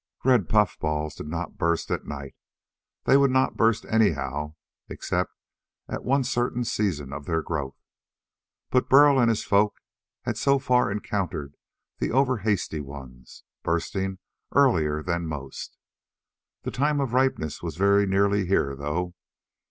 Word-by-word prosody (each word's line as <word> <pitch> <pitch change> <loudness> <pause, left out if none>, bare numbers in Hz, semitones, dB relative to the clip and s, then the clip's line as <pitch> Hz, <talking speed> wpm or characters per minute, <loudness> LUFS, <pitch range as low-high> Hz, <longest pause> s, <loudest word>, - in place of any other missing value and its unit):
Red 125 -7 +4
puffballs 75 -8 +1
did 75 - -8
not 85 +5 -5
burst 85 -2 0
at - - -2
night. 70 -2 -7 0.7
They 135 - +5
would 140 -1 +4
not 130 0 +2
burst 115 -1 +2
anyhow, 75 - 0 0.3
except - - -2 0.6
at - - -5
one 135 +2 +2
certain 120 -1 -1
season 80 - -2
of 70 0 -7
their 80 -1 0
growth. 70 -5 -4 0.9
But 125 - +2
Burl 140 0 +7
and 120 -2 +4
his 115 - 0
folk 100 +1 +2 0.5
had - - -3
so 140 0 +3
far 125 -5 +2
encountered 95 -8 -3 0.4
the - - 0
over 130 0 +2
hasty 100 -6 -1
ones, 65 -3 -10 0.2
bursting 95 +3 -2 0.4
earlier 80 - +3
than 85 -1 -2
most. 70 -3 -7 0.9
The - - -3
time 145 +2 +1
of 135 -4 -1
ripeness 130 - 0
was 85 -3 -5
very 100 +1 +4
nearly 100 0 +2
here, 70 -7 +1
though. 80 +6 -3
95 Hz, 140 wpm, -26 LUFS, 75-120 Hz, 0.9 s, Burl